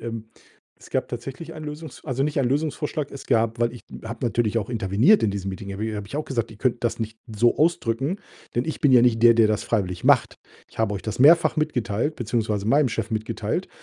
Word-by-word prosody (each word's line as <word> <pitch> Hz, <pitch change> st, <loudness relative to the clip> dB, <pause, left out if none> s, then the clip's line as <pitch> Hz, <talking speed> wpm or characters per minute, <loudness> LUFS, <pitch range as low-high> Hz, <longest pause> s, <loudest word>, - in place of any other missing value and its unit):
Ähm, 115 Hz, -1 st, -6 dB, 0.5 s
es -, -, -15 dB
gab -, -, -1 dB
tatsächlich 160 Hz, +5 st, -7 dB
ein 155 Hz, -, -9 dB
Lösungs 150 Hz, +1 st, -8 dB
also, 135 Hz, -2 st, -1 dB
nicht 150 Hz, +1 st, -1 dB
einen 125 Hz, -, +1 dB
Lösungsvorschlag. 150 Hz, +1 st, -2 dB
Es 140 Hz, -, -10 dB
gab 115 Hz, 0 st, +1 dB
weil 120 Hz, 0 st, +2 dB
ich 120 Hz, -, -11 dB, 0.2 s
habe 115 Hz, +3 st, -5 dB
natürlich 115 Hz, -1 st, 0 dB
auch 110 Hz, 0 st, -1 dB
interveniert 115 Hz, -, +3 dB
in 110 Hz, -, +2 dB
diesem 100 Hz, -1 st, -4 dB
Meeting, 100 Hz, +1 st, -7 dB
habe 110 Hz, +2 st, -3 dB
habe 105 Hz, -1 st, -5 dB
ich 125 Hz, -, -6 dB
auch 150 Hz, -, -2 dB
gesagt: 115 Hz, -4 st, -2 dB
„Ihr 110 Hz, -, -12 dB
könnt 125 Hz, +1 st, -1 dB
das 120 Hz, -, 0 dB
nicht 110 Hz, -1 st, -5 dB, 0.2 s
so 120 Hz, +3 st, +3 dB
ausdrücken, 145 Hz, -, +1 dB, 0.4 s
denn 120 Hz, -, 0 dB
ich 160 Hz, -, -4 dB
bin 145 Hz, -, +4 dB
ja 125 Hz, -2 st, +7 dB
nicht 115 Hz, -2 st, +3 dB
der, 120 Hz, 0 st, +8 dB
der 115 Hz, -1 st, +5 dB
das 105 Hz, -1 st, 0 dB
freiwillig 90 Hz, -6 st, -2 dB
macht. -, -, +4 dB, 0.3 s
Ich -, -, -18 dB
habe 110 Hz, -2 st, +1 dB
euch 100 Hz, -, -5 dB
das 110 Hz, -1 st, -5 dB
mehrfach 165 Hz, +6 st, +6 dB
mitgeteilt, 130 Hz, -2 st, -1 dB
beziehungsweise 110 Hz, -3 st, -1 dB
meinem 140 Hz, +4 st, +4 dB
Chef 115 Hz, -1 st, -3 dB
mitgeteilt 110 Hz, -1 st, -2 dB
115 Hz, 225 wpm, -24 LUFS, 110-140 Hz, 0.5 s, der